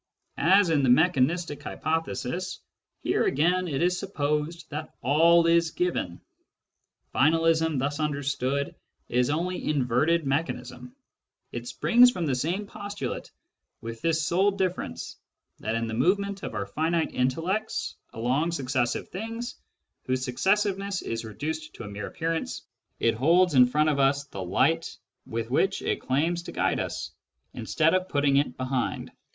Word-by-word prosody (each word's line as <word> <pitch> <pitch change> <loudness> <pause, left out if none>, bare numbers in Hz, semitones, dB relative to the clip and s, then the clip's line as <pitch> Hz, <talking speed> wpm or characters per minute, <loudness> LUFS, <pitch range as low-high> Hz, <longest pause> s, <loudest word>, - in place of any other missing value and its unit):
As 190 -1 +6
in 150 -3 +3
the 130 - +2
mechanistic 155 +2 +2
hypothesis, 165 +3 -3 0.4
here - - +1
again 180 +6 +2
it 145 0 -1
is 180 0 +2
supposed 155 -2 -2
that 155 +2 -6
all 165 +6 +5
is 170 0 +4
given. 165 - -2 0.9
Finalism 160 +1 +3
thus 145 +3 -1
understood 140 -2 -1 0.4
is 125 +1 +2
only 175 +5 -1
inverted 150 +4 +2
mechanism. 125 -4 -3 0.6
It 120 0 -6
springs 245 - +5
from 180 -8 -2
the 140 - 0
same 170 +11 -1
postulate, 205 0 -5 0.5
with 115 0 -7
this 160 -2 +1
sole 195 +4 +2
diflTerence, 175 - -3 0.4
that 110 +2 -2
in 115 0 -1
the 110 - -4
movement 195 - +1
of - - -5
our 100 - -2
finite 160 +10 0
intellects 165 +12 -1 0.2
along 135 +9 0
successive 130 -4 -1
things, 225 +4 -5 0.5
whose 130 0 0
successiveness 195 +7 0
is 115 0 -3
reduced 155 +9 -5
to - - -8
a - - -7
mere 100 0 -6
appearance, 165 0 -3 0.4
it 115 - +3
holds 170 +8 +4
in 125 -2 +7
front 150 +4 +2
of 145 -2 0
us 140 +1 +3
the 100 -9 -8
light 165 - +1 0.3
with 115 +1 -4
which 195 +8 +1
it - - -1
claims 165 +6 0
to - - -8
guide - - 0
us, - - -4 0.4
instead 160 +1 +1
of 185 0 +1
putting 140 -1 +2
it 140 -3 0
behind. 130 -1 -2
155 Hz, 145 wpm, -27 LUFS, 130-175 Hz, 0.9 s, in